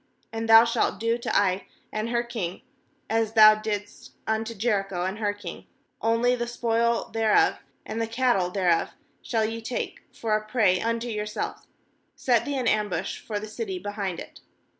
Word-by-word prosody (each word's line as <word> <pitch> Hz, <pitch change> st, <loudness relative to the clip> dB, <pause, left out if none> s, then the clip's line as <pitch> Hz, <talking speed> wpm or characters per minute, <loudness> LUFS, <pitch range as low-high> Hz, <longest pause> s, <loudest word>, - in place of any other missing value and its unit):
2And 225 Hz, 0 st, -3 dB
thou 225 Hz, +1 st, +9 dB
shalt 230 Hz, -4 st, 0 dB
do 230 Hz, +2 st, 0 dB
to -, -, 0 dB
Ai 190 Hz, -1 st, 0 dB, 0.2 s
and 215 Hz, +2 st, -2 dB
her 235 Hz, 0 st, +1 dB
king 220 Hz, -7 st, -5 dB, 0.4 s
as 225 Hz, -1 st, 0 dB
thou 215 Hz, -1 st, +9 dB
didst 210 Hz, -1 st, -5 dB
unto 220 Hz, +1 st, -1 dB
Jericho 195 Hz, -4 st, 0 dB
and 190 Hz, +3 st, -3 dB
her 205 Hz, -2 st, +1 dB
king: 205 Hz, 0 st, -9 dB, 0.3 s
only 230 Hz, +2 st, +2 dB
the 240 Hz, -1 st, -3 dB
spoil 235 Hz, -1 st, 0 dB
thereof, 220 Hz, -1 st, +3 dB, 0.3 s
and 220 Hz, +1 st, -3 dB
the 225 Hz, -, 0 dB
cattle 230 Hz, -6 st, +1 dB
thereof, 180 Hz, -3 st, +1 dB, 0.3 s
shall 225 Hz, -3 st, 0 dB
ye 225 Hz, +1 st, -4 dB
take 235 Hz, +2 st, -4 dB
for 220 Hz, -2 st, -1 dB
a 215 Hz, -, -1 dB
prey 215 Hz, -5 st, +2 dB
unto 230 Hz, +1 st, -1 dB
your 210 Hz, -2 st, -3 dB
selves; 210 Hz, -, -5 dB, 0.5 s
set 240 Hz, -3 st, +2 dB
thee 285 Hz, -1 st, -2 dB
an 250 Hz, -3 st, -1 dB
ambush 205 Hz, -4 st, 0 dB
for 210 Hz, -2 st, -4 dB
the 210 Hz, -, -6 dB
city 215 Hz, -3 st, -4 dB
behind 200 Hz, -1 st, -4 dB
it.' -, -, -10 dB
220 Hz, 175 wpm, -26 LUFS, 205-230 Hz, 0.5 s, thou